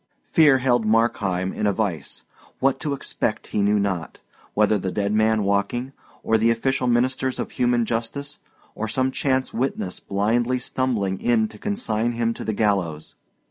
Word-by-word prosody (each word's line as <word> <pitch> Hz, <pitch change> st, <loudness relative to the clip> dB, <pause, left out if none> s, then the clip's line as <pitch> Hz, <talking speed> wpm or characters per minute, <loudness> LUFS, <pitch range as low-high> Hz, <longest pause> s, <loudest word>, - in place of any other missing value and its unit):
Fear 150 Hz, -4 st, +6 dB
held 125 Hz, -2 st, +2 dB
Markheim 105 Hz, -4 st, +1 dB
in 105 Hz, -, -1 dB
a 100 Hz, -, +2 dB
vice. 95 Hz, -6 st, -3 dB, 0.3 s
What 135 Hz, 0 st, +1 dB
to 150 Hz, -2 st, -2 dB
expect 140 Hz, -, -2 dB
he 105 Hz, -, +2 dB
knew 105 Hz, +1 st, +3 dB
not 95 Hz, -5 st, -2 dB, 0.4 s
whether 105 Hz, 0 st, +3 dB
the 95 Hz, 0 st, -3 dB
dead 100 Hz, +1 st, -1 dB
man 110 Hz, 0 st, +3 dB
walking, 100 Hz, +7 st, -1 dB, 0.3 s
or 110 Hz, 0 st, +2 dB
the 115 Hz, +2 st, +3 dB
official 125 Hz, +3 st, 0 dB
ministers 130 Hz, +2 st, +1 dB
of -, -, -4 dB
human 120 Hz, -1 st, +1 dB
justice, 130 Hz, +6 st, -3 dB, 0.3 s
or 110 Hz, -, -3 dB
some 130 Hz, +4 st, 0 dB
chance 130 Hz, -1 st, 0 dB
witness 115 Hz, -7 st, -2 dB
blindly 115 Hz, +5 st, 0 dB
stumbling 120 Hz, -7 st, -1 dB
in 115 Hz, -2 st, +2 dB
to 105 Hz, -, -14 dB
consign 120 Hz, -, -1 dB
him 115 Hz, 0 st, 0 dB
to -, -, -7 dB
the 110 Hz, -, -2 dB
gallows. 95 Hz, -8 st, -1 dB
115 Hz, 165 wpm, -23 LUFS, 100-130 Hz, 0.4 s, Fear